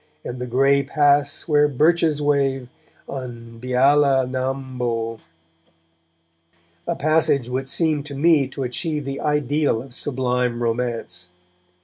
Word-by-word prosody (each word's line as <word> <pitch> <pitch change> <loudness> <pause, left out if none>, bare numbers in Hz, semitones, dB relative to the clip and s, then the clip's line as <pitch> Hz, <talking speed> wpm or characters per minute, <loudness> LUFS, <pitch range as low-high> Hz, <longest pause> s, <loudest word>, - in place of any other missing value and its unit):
And 125 - -5
the 125 - -3
grey 135 +3 +3
pass 145 +1 +1
where 150 -2 +4
birches 155 +1 +2
wave, 135 -3 0 0.4
On 120 -3 -8
Beala 135 +1 +3
nam 130 0 -4
bo, 115 -2 -2 1.7
a - - 0
passage 150 -4 +2
which 130 +2 -3
seemed 150 0 0
to 140 - -7
me 150 -1 +3
to 135 0 -5
achieve 150 +3 -3
the 135 0 -4
ideal 150 -3 +1
of 135 -2 -14
sublime 125 -3 -1
romance. 115 -7 -2
135 Hz, 120 wpm, -22 LUFS, 125-145 Hz, 1.7 s, where